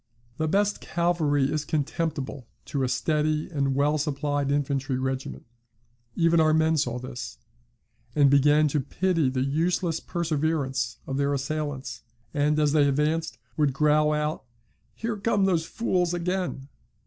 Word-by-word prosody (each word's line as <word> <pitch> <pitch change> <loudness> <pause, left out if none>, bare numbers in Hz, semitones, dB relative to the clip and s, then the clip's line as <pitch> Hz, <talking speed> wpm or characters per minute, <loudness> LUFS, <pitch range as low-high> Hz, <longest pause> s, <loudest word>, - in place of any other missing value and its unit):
"The 155 - 0
best 205 +5 +1
cavalry 155 -5 +1
is 155 -1 -1
contemptible 145 -3 -3 0.2
to 140 - -2
a 130 - +1
steady 155 +1 0
and 140 -3 0
well 145 +2 +2
supplied 145 -1 -1
infantry 140 -2 0
regiment; 130 0 -4 0.7
even 165 -1 +3
our 155 -1 +4
men 160 0 +3
saw 125 -5 0
this, 125 0 -7 0.8
and 145 -2 +5
began 145 +2 +5
to 150 - 0
pity 165 +1 0
the 130 0 -1
useless 165 +3 0
perseverance 145 -8 -1
of 135 - -3
their 140 0 +1
assailants, 140 -4 -4 0.3
and, 150 +1 +2
as 150 -1 +3
they 145 -1 +4
advanced, 155 +3 0 0.2
would 145 -3 +2
growl 150 +2 +3
out, 150 0 -1 0.5
'Here 225 -1 -3
come 205 -1 +1
these 170 -4 +1
fools 180 -4 0
again!' 175 -5 -2
150 Hz, 140 wpm, -26 LUFS, 140-165 Hz, 0.8 s, and